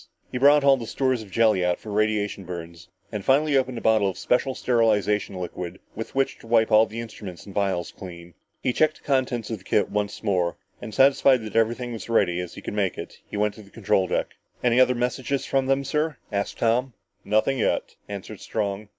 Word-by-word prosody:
He 125 - -3
brought 145 +2 +6
all 140 -1 +6
the 115 -3 -6
stores 130 -2 0
of 105 - -11
jelly 110 -3 +3
out 90 0 +1
for 110 - -9
radiation 105 -1 0
burns 85 -1 -8 0.2
and 105 -3 -4
finally 145 +4 +3
opened 130 -2 +1
a - - -5
bottle 110 -3 +3
of 95 - -6
special 130 +1 +1
sterilization 105 -5 +1
liquid 90 0 -5 0.2
with 115 +4 -7
which 135 0 0
to - - -14
wipe 115 -1 +3
all 110 +1 +6
the 110 +2 -7
instruments 105 -6 -8
and 100 - -10
vials 95 -4 -1
clean. 85 -2 -10 0.3
He 125 - +1
checked 155 +2 +2
the - - -24
contents 130 -5 0
of 110 - -3
the - - -20
kit 105 - +1
once 105 +1 -2
more, 90 -5 0 0.2
and, - - -7
satisfied 135 0 +4
that 110 - -8
everything 120 +2 +1
was 110 -4 -6
as - - -15
ready 90 -6 +2
as 90 -1 -6
he - - -10
could - - -5
make 100 -4 0
it, - - -8
he - - -6
went 105 0 +1
up - - -20
to - - -10
the 100 - -16
control 100 -3 +1
deck. - - -1 0.3
"Any 120 0 +3
other 125 0 +5
message 125 +2 -1
from 135 -1 +1
them 135 +1 +2
yet, - - -8
sir?" 150 0 -1
asked 100 -1 -2
Tom. 120 +3 +1 0.3
"Nothing 110 +6 +1
yet," - - 0
answered 100 0 -7
Strong. 105 -1 -3
110 Hz, 225 wpm, -25 LUFS, 100-125 Hz, 0.3 s, brought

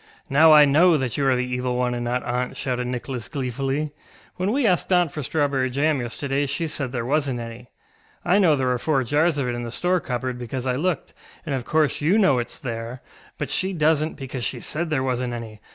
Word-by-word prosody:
ŌĆ£Now 155 +3 +7
I 150 -1 +9
know 160 +4 +5
that 130 -4 -2
you 140 -1 +1
are 130 - +4
the 125 0 0
Evil 125 0 -2
One 125 0 0
and 120 0 -3
not 120 +1 -1
aunt, 125 +1 -2
ŌĆØ - - -13
shouted 125 -1 -2
Nicholas 125 -2 -4
gleefully; 135 +4 -2 0.5
ŌĆ£when 185 +3 +1
we 265 +1 +1
asked 185 -2 +1
aunt 175 -4 +3
for 150 - -5
strawberry 140 -2 0
jam 140 +2 +1
yesterday 135 +4 -2
she 140 +5 -2
said 145 -5 -3
there 120 -3 -3
wasnŌĆÖt 140 -2 0
any. 115 +1 -8 0.6
I 190 +3 +4
know 170 -6 +5
there 130 -2 0
are 125 - 0
four 140 -1 +1
jars 150 +5 +2
of 135 -3 -1
it 120 - -1
in 120 - -4
the 120 - -5
store 180 +10 +1
cupboard, 125 -3 -3
because 125 +1 -5
I 130 - +1
looked, 165 +6 -2 0.3
and 150 - -2
of 130 -3 -2
course 155 -2 +1
you 170 +8 +3
know 190 -12 +4
itŌĆÖs 120 - -4
there, 115 0 -5 0.3
but - - -3
she 190 0 -1
doesnŌĆÖt, 155 0 +2
because 130 -2 -6
she - - -2
said 165 +2 -3
there 145 -4 0
wasnŌĆÖt 125 -1 -1
any. 110 -3 -7
135 Hz, 230 wpm, -23 LUFS, 125-155 Hz, 0.6 s, I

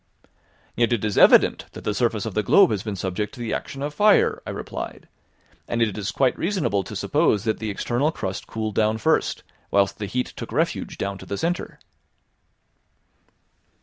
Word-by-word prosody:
"Yet 120 +1 +2
it 110 -2 -1
is 105 - -1
evident - - +6
that - - -9
the 105 - -1
surface 115 -2 0
of 110 - -4
the 105 - +1
globe 195 - +5
has 105 - -1
been 105 -1 -4
subject 95 +6 -3
to - - -13
the 115 -2 -3
action 135 0 -4
of 145 0 -3
fire," 210 +6 +4
I - - -3
replied, - - -6 0.6
"and 120 - -2
it 110 -4 +1
is 105 0 -3
quite 130 -2 +1
reasonable 170 - 0
to - - -8
suppose 105 - +1
that 110 -2 -1
the 110 - -3
external 120 +8 0
crust 95 - -5
cooled 110 -1 -3
down 110 +1 +2
first, 110 - +1 0.3
whilst 100 +1 +2
the 105 - -3
heat 125 +5 -2
took - - -7
refuge - - -1
down 100 -1 -3
to - - -11
the 100 - -3
centre." 175 - -2
110 Hz, 185 wpm, -23 LUFS, 100-125 Hz, 0.6 s, evident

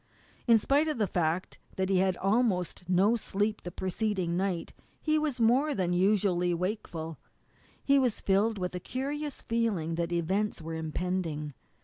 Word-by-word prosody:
In 230 -1 +7
spite 280 +8 +2
of 305 -4 -1
the 215 - +2
fact 175 -1 -1 0.2
that 190 0 -1
he 190 - +3
had 190 -1 +2
had - - -13
almost 195 -4 0
no 195 +5 +4
sleep 210 -1 -1
the 175 - -6
preceding 185 -1 -1
night, 185 -2 -2 0.3
he 310 -1 +1
was 295 -5 -1
more 260 +6 +3
than 180 -4 0
usually 180 -2 +2
wakeful. 170 -4 -4 0.6
He 280 0 +4
was 250 -5 +1
filled 205 +3 +2
with 180 -1 -3
a 180 - -3
curious 280 - -4
feeling 220 -9 0
that 170 0 -1
events 190 +5 0
were 165 0 -6
impending. 160 -2 -3
190 Hz, 160 wpm, -29 LUFS, 175-230 Hz, 0.6 s, In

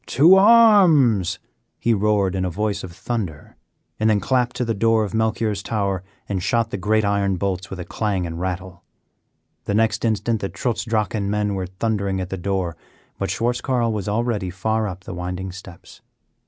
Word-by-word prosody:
"To 160 +8 +6
arms!" 190 - +5 0.4
he 115 - +1
roared 105 -2 +1
in 95 -1 -1
a 90 - 0
voice 100 +3 -2
of 95 - -7
thunder, 95 -5 -5 0.4
and 110 0 +3
then 105 -1 +3
clapped 125 +3 0
to 125 - -1
the 115 - 0
door 115 +1 +2
of 100 - -5
Melchior's 110 -2 0
tower 100 -4 -2 0.2
and 95 -3 -2
shot 115 +3 0
the - - -2
great 105 +3 +1
iron 100 -1 +1
bolts 95 0 -3
with 95 - -7
a 90 - -5
clang 100 -5 -2
and 85 0 -5
rattle. 90 -1 -4 0.8
The 100 - -1
next 115 +1 +1
instant 110 0 0
the 95 - -2
Trutz 120 -5 -2
Drachen 105 -3 -1
men 105 0 0
were 95 -2 -3
thundering 100 0 -2
at 90 -1 -5
the 95 - -3
door, 95 -2 -2 0.4
but - - -2
Schwartz 120 +1 -1
Carl 120 -4 0
was 105 -1 -3
already 105 -3 -1
far 110 +4 -1
up 95 -1 -7
the 95 - -7
winding 90 +2 -4
steps. 90 -1 -13
105 Hz, 185 wpm, -22 LUFS, 95-115 Hz, 0.8 s, To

